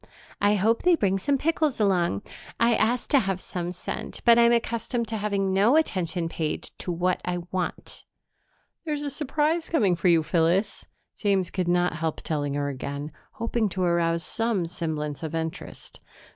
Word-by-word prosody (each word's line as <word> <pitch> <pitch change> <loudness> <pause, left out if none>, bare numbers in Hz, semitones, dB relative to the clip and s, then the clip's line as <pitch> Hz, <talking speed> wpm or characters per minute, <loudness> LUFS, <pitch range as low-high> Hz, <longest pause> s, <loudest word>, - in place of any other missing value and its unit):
"I 205 +1 +4
hope 220 +4 +2
they 360 -1 +5
bring 195 - +1
some 280 +7 +1
pickles 310 -2 0
along. 180 - +1 0.4
I 235 0 +4
asked 235 +2 +1
to 285 - +6
have 195 -5 -1
some 175 -1 -4
sent, 180 - -6
but 235 0 +7
I'm 235 0 +6
accustomed 235 0 0
to 225 - -2
having 200 -2 0
no 205 +8 +4
attention 180 - +1
paid 160 -2 -3
to 180 - -3
what 180 +1 0
I 175 -1 -2
want." 185 -1 -3 0.8
"There's 300 -3 -2
a 285 - -3
surprise 305 +3 0
coming 205 - +3
for 175 - 0
you, 165 -2 +5
Phyllis," 175 +5 +1 0.3
James 195 -4 +1
could 185 -2 -1
not 175 -1 +2
help 160 -1 -2
telling 145 -3 -2
her 145 0 -1
again, 140 +2 -5 0.2
hoping 230 -1 -1
to 185 0 -2
arouse 170 -1 +1
some 225 -6 -1
semblance 155 -4 -4
of 160 0 -4
interest. 165 +2 -6
190 Hz, 170 wpm, -26 LUFS, 170-230 Hz, 0.8 s, but